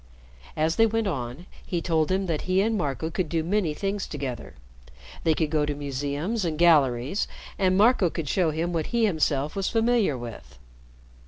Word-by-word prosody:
As 160 +1 +1
they 225 - +6
went 225 0 0
on, 135 -3 -4 0.2
he 175 - -2
told 160 -1 0
him 190 +1 +1
that 165 -4 -1
he 185 +1 +3
and 225 +2 +1
Marco 160 -2 -2
could 180 -3 -2
do 165 -2 0
many 175 -3 0
things 195 +3 -2
together. 135 -5 -6 0.7
They 160 -1 +3
could 155 -2 -1
go 155 -2 +2
to 145 0 -1
museums 145 - -2
and 160 -3 -2
galleries, 150 - +3 0.3
and 185 -1 +3
Marco 210 -3 +4
could 160 -2 -5
show 175 +2 +2
him 165 +3 -2
what 160 -2 -1
he 235 -1 +2
himself 155 -6 0
was 195 -1 -1
familiar 225 - +2
with. 110 - -9
165 Hz, 180 wpm, -26 LUFS, 145-195 Hz, 0.7 s, they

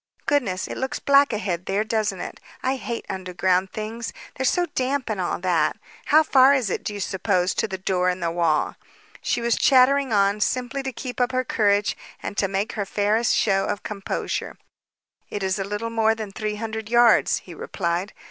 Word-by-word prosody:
Goodness, 225 -11 0
it - - -6
looks 265 +2 -2
black 280 0 +4
ahead 190 -5 -3
there, 200 +2 +1
doesn't 215 -3 -1
it? - - -7 0.2
I 260 +1 +1
hate 235 -2 -5
underground 185 0 0
things. 225 +2 -5 0.2
They're 265 - -1
so 355 +6 +2
damp 260 -1 -1
and 200 -3 -2
all 175 - -1
that. 180 -3 +1 0.3
How 310 +1 +5
far 270 -2 +6
is 240 -8 0
it, - - -2
do - - -3
you - - -5
suppose, 185 -1 0
to - - 0
the 190 -2 -4
door 185 -1 +1
in 180 0 -2
the 170 -1 -1
wall?" 165 -3 +1 0.4
She 240 - -1
was 235 0 +2
chattering 270 0 +4
on, 200 0 +3
simply 255 +4 -1
to 265 0 -4
keep 250 0 -5
up 245 - +2
her 255 0 +1
courage 205 -2 +2 0.2
and - - -6
to 195 - +2
make 195 +4 -1
her 205 -3 -3
fairest 215 +4 +1
show 195 -2 +2
of 205 - -3
composure. 200 -2 -4 0.7
"It's 190 -2 -2
a - - 0
little 210 +3 -4
more 225 -1 +2
than 215 -3 -6
three 210 +1 -3
hundred 220 0 -5
yards," 235 -1 +5
he 180 - -10
replied. 175 +3 -3
210 Hz, 195 wpm, -24 LUFS, 190-245 Hz, 0.7 s, far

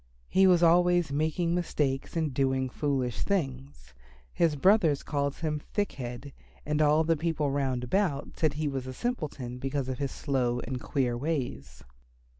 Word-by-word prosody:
He 190 0 +5
was 175 -2 +5
always 175 -1 +4
making 160 +4 0
mistakes 150 -5 -1
and 155 -4 0
doing 130 -1 +1
foolish 130 -6 -1
things. 135 - -3 0.4
His 165 -3 +2
brothers 165 -2 +3
called 140 -1 -1
him 155 -2 -2
Thick 205 +7 -2
head, 125 +1 -7 0.3
and 150 +1 0
all 150 +1 +4
the 165 +1 +2
people 155 -2 -1
round 135 -3 -1
about 145 0 0
said 155 -3 +2
he 150 +1 -2
was 135 -2 -3
a 130 - -5
simpleton 145 - -4
because 135 0 -2
of 130 - -4
his 140 -1 -1
slow 125 -4 -1
and 130 -2 -5
queer 125 -3 0
ways. 120 - -4
145 Hz, 160 wpm, -29 LUFS, 130-165 Hz, 0.4 s, He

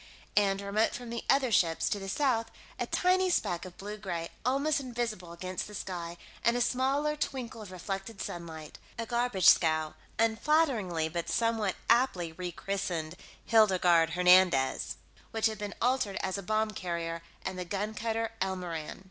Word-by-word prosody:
And, 200 -1 +3
remote 205 +3 +1
from 245 -1 -7
the 235 - -4
other 270 -3 +4
ships, 165 -6 +3
to 205 - -1
the 195 0 -6
south, 235 -1 +1 0.3
a - - -1
tiny 370 +1 +3
speck 175 - 0
of 180 -1 -11
blue 210 +2 -6
gray, 175 -5 -4
almost 280 +4 +2
invisible 235 -9 -4
against 185 +2 -4
the 210 - -9
sky, 175 -3 -5 0.3
and 235 +1 +3
a - - 0
smaller 270 +5 +1
twinkle 250 -5 -4
of 205 -3 -9
reflected 195 +3 -5
sunlight 160 -4 -7 0.2
a 230 - -2
garbage 235 -4 +1
scow, 155 -2 +5 0.2
unflatteringly 225 - +2
but 170 +1 -4
somewhat 225 -4 +1
aptly 230 -9 +3
rechristened 175 -1 -3 0.3
Hildegarde 180 -7 +4
Hernandez, 180 -7 +4 0.3
which 225 -1 -1
had 220 -2 +1
been 205 -1 -5
altered 245 -5 +1
as 190 -1 -2
a 200 - -3
bomb 215 +2 0
carrier, 170 -3 -3 0.2
and 185 -1 -3
the - - -2
gun 205 +4 -3
cutter 225 +1 -2
Elmoran. 180 -5 -3
200 Hz, 155 wpm, -30 LUFS, 175-230 Hz, 0.3 s, scow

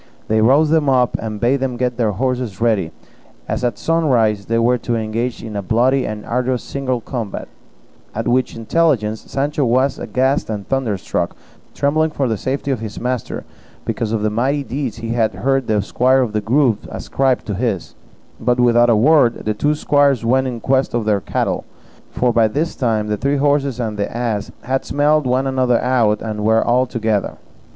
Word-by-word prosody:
They 110 0 +3
roused 140 +7 +4
them 155 -3 +3
up, 125 -2 +2
and 110 -2 -5
bade 120 +5 +2
them 130 -2 -2
get 125 0 -1
the 115 -3 0
horses 125 -2 -2
ready, 110 -8 +1 0.6
as - - -2
at 120 -4 0
sunrise 120 -11 +1
they 115 - +1
were 120 +2 +2
to 120 +1 -2
engage 115 +2 -3
in 110 -2 -7
a 100 - -1
bloody 125 +7 +2
and 105 0 -6
arduous 125 +1 -1
single 130 -3 -3
combat; 115 -4 -5 0.7
at 115 +1 -2
which 125 +1 +1
intelligence 115 -4 +1
Sancho 145 +1 -2
was 130 +3 +1
aghast 130 +1 0
and 105 -2 -4
thunderstruck, 100 -10 -2 0.4
trembling 155 +3 +1
for 140 -3 -1
the 115 - 0
safety 135 +6 -2
of 130 - -1
his 110 -2 -6
master 125 -1 -3 0.4
because 110 -2 -2
of 110 -2 -1
the 105 - +1
mighty 135 +6 0
deeds 130 -4 -4
he 115 0 -6
had 115 -2 0
heard 135 0 0
the 105 -3 +1
squire 130 +5 +2
of 110 -4 -4
the 105 - 0
Grove 120 -1 +1
ascribe 135 -2 -1
to 105 - -3
his; 100 -3 -2 0.5
but 125 0 +1
without 120 0 +4
a 115 - +5
word 125 +1 +3
the 110 - +1
two 145 +8 0
squires 145 -5 +2
went 130 +3 +2
in 120 -2 -4
quest 130 0 +1
of 115 -2 -1
their 105 -2 +1
cattle; - - -1 0.5
for 125 -1 0
by 115 -1 +4
this 150 +10 -2
time 110 -5 0
the 105 0 -1
three 140 +5 0
horses 140 -3 +1
and 110 -3 -3
the 100 - -1
ass 115 -3 -2
had 130 +2 -1
smelt 150 +1 +2
one 130 +2 +1
another 130 -3 +2
out, 115 -5 +1
and 105 -2 -4
were 110 +1 +3
all 125 +2 +2
together. 110 -4 -1
120 Hz, 190 wpm, -19 LUFS, 110-135 Hz, 0.7 s, a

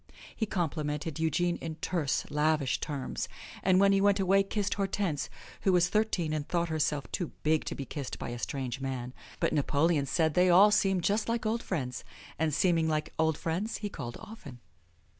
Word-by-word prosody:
He 220 - -1
complimented 155 -4 -2
Eugene 170 +2 +1
in 160 -1 -5
terse, 160 -3 -1
lavish 150 -2 +1
terms, 140 -4 -4 0.3
and 185 -1 +4
when 200 0 +5
he 195 0 +3
went 200 0 +4
away 195 +1 +4
kissed 200 +1 -1
Hortense, 195 -6 -1 0.3
who 195 - +3
was 180 -1 +4
thirteen 195 -7 +1
and 150 -1 -2
thought 170 -1 0
herself 150 -2 0
too 175 -4 -3
big 155 0 +2
to - - -3
be 140 - -5
kissed 140 0 -5
by - - -5
a 120 0 -5
strange 130 -1 -3
man. 130 -2 -4 0.3
But - - +1
Napoleon 145 0 +2
said 160 +2 +1
they 180 +2 +4
all 195 +4 +7
seemed 195 -3 +2
just 210 +5 +1
like 230 0 -1
old 225 +2 0
friends. 130 -9 -3 0.4
And 160 -1 +2
seeming 165 +1 +2
like 155 -1 -1
old 160 -1 +2
friends 180 +7 -2
he 210 - -4
called 120 -10 -6
often. 210 - -11
165 Hz, 185 wpm, -30 LUFS, 150-195 Hz, 0.4 s, all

